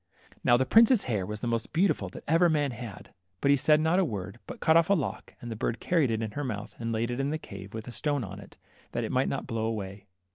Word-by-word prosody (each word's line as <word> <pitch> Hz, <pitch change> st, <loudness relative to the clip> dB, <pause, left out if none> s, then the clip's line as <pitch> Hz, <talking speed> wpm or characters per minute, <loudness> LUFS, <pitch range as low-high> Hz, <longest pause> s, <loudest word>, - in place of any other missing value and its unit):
Now 120 Hz, -, +5 dB
the 130 Hz, -, +1 dB
prince's 230 Hz, -, +6 dB
hair 105 Hz, -6 st, -1 dB
was 105 Hz, 0 st, -5 dB
the -, -, -2 dB
most 115 Hz, -1 st, -2 dB
beautiful 165 Hz, -, +2 dB
that -, -, -10 dB
ever 165 Hz, +3 st, +4 dB
man 145 Hz, -3 st, +1 dB
had, 115 Hz, -4 st, -9 dB, 0.3 s
but 140 Hz, -, +3 dB
he -, -, +7 dB
said 150 Hz, +2 st, +4 dB
not 160 Hz, +4 st, +3 dB
a -, -, +4 dB
word, 105 Hz, -, -4 dB
but -, -, -8 dB
cut 160 Hz, -, +4 dB
off 165 Hz, +1 st, +5 dB
a 200 Hz, -, +5 dB
lock, 150 Hz, -8 st, -4 dB
and 120 Hz, -, -7 dB
the -, -, -3 dB
bird 115 Hz, +2 st, -2 dB
carried 165 Hz, -7 st, +2 dB
it 115 Hz, 0 st, -1 dB
in 110 Hz, -, -3 dB
her 145 Hz, +7 st, -4 dB
mouth 105 Hz, -6 st, -4 dB
and 115 Hz, 0 st, -2 dB
laid 115 Hz, +2 st, -1 dB
it 120 Hz, -, -3 dB
in 135 Hz, +1 st, 0 dB
the 155 Hz, -, -1 dB
cave, 100 Hz, -7 st, -10 dB
with 110 Hz, +1 st, -6 dB
a -, -, -6 dB
stone 145 Hz, +1 st, -1 dB
on 95 Hz, -1 st, -7 dB
it, 100 Hz, -, -14 dB, 0.4 s
that -, -, -1 dB
it -, -, -3 dB
might -, -, +2 dB
not -, -, -3 dB
blow 115 Hz, -1 st, -2 dB
away. 100 Hz, -3 st, -4 dB
120 Hz, 280 wpm, -28 LUFS, 105-155 Hz, 0.4 s, he